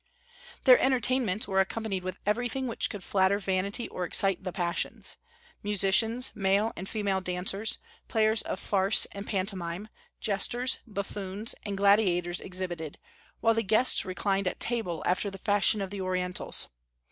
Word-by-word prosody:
Their 255 -2 +8
entertainments 255 -4 +2
were 190 -1 +1
accompanied 195 -1 -1
with 185 0 -4
everything 245 +5 0
which 235 - -1
could 205 -4 -7
flatter 190 +1 +2
vanity 200 +3 -1
or 180 - -5
excite 195 +2 +1
the 185 - -3
passions; 175 -2 -2 0.4
musicians, 210 +4 +3
male 200 +1 +1
and 190 +2 -7
female 200 -3 -1
dancers, 185 +4 -2 0.3
players 220 0 +2
of - - -4
farce 195 0 +3
and 200 +1 -7
pantomime, 190 0 -2 0.3
jesters, 240 +5 0
buffoons, 200 0 -2
and 200 -1 -3
gladiators 185 -3 +3
exhibited, 180 -5 -5 0.4
while 225 - +4
the 225 - +1
guests 220 +5 +3
reclined 195 +1 -1
at 180 - -2
table 220 -9 -2
after 185 +3 +1
the 195 - -8
fashion 205 +1 +3
of 195 -1 -4
the 200 -1 -4
Orientals. 180 -1 -1
200 Hz, 145 wpm, -29 LUFS, 185-220 Hz, 0.4 s, Their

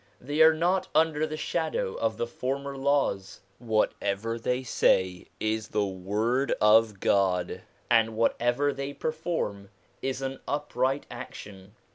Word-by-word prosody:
They 145 +5 -1
are 160 0 +8
not 180 +4 +1
under 155 -1 +3
the 155 0 -5
shadow 155 - -1
of 110 -1 -1
the 120 - -1
former 135 +4 -4
laws. 135 -9 0 0.2
Whatever 110 -1 -1
they 125 +2 -1
say 95 -6 +1
is 110 0 -1
the 105 -1 0
word 105 +8 0
of 105 -1 +4
God, 95 -3 +1 0.3
and 115 -1 +3
whatever 120 +5 +1
they 140 +1 -5
perform 155 - -3 0.3
is 135 0 -3
an 135 0 -4
upright 140 -2 -1
action. 105 -5 -10
120 Hz, 130 wpm, -27 LUFS, 105-140 Hz, 0.3 s, are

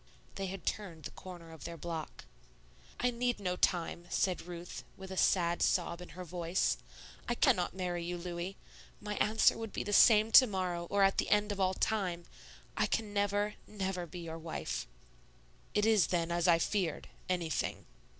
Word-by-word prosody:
They 195 -1 -3
had 190 -2 -7
turned 175 -7 -3
the - - -6
corner 175 -3 -10
of 160 -3 -11
their 170 0 -6
block. 160 - -6 0.7
"I 245 0 +2
need 245 -1 -1
no 180 -3 -1
time," 175 -1 0
said 180 -1 0
Ruth, 175 0 -7
with 190 0 -9
a - - -4
sad 175 -2 +2
sob 170 +1 +1
in 180 - -9
her 185 - -5
voice; 175 +1 0 0.5
"I 240 - +1
cannot 205 -10 +2
marry 175 -2 -2
you, 175 +1 -3
Louis. 175 +2 -5 0.4
My 210 0 -4
answer 220 +1 +4
would 225 -2 -5
be - - -3
the 205 - -3
same 215 +1 +7
to 255 +3 +9
morrow 180 -4 -2
or 200 0 +3
at 195 0 +3
the - - 0
end 210 0 +3
of 200 - -4
all 190 0 +2
time, 180 -6 -1 0.5
I - - +2
can 215 -2 -1
never, 205 +1 +1
never 190 -4 -3
be 175 +2 -8
your 165 -1 -6
wife." 160 - -4 0.9
"It 210 0 +3
is 215 -6 +5
then 170 -1 0
as 175 +1 +1
I 170 -1 +6
feared, 175 -1 -1 0.2
anything." 170 -4 -1
185 Hz, 180 wpm, -33 LUFS, 170-205 Hz, 0.9 s, to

